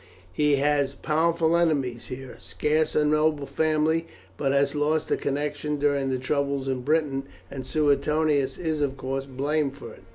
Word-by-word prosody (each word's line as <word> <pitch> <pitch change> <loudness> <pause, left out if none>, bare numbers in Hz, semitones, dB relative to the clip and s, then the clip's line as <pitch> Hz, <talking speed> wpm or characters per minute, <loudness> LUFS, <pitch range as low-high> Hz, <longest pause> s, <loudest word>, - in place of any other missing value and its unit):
He 150 +3 +3
has 140 -1 +1
powerful 165 +2 +1
enemies 140 -8 0
here; 130 0 -8
scarce 155 +1 0
a 150 - +3
noble 150 -1 +2
family 155 +3 +1 0.3
but 135 +7 0
has 140 0 +2
lost 150 +1 0
a - - +4
connection 145 +1 -2
during 140 -1 +1
the 130 - 0
troubles 140 +1 -1
in 130 -1 -1
Britain, 140 -1 0 0.3
and 130 -2 -6
Suetonius 150 -1 +1
is 160 -3 -2
of 140 -1 -1
course 135 +1 -3
blamed 140 +1 -1
for - - -9
it. - - -16
145 Hz, 160 wpm, -26 LUFS, 135-155 Hz, 0.3 s, a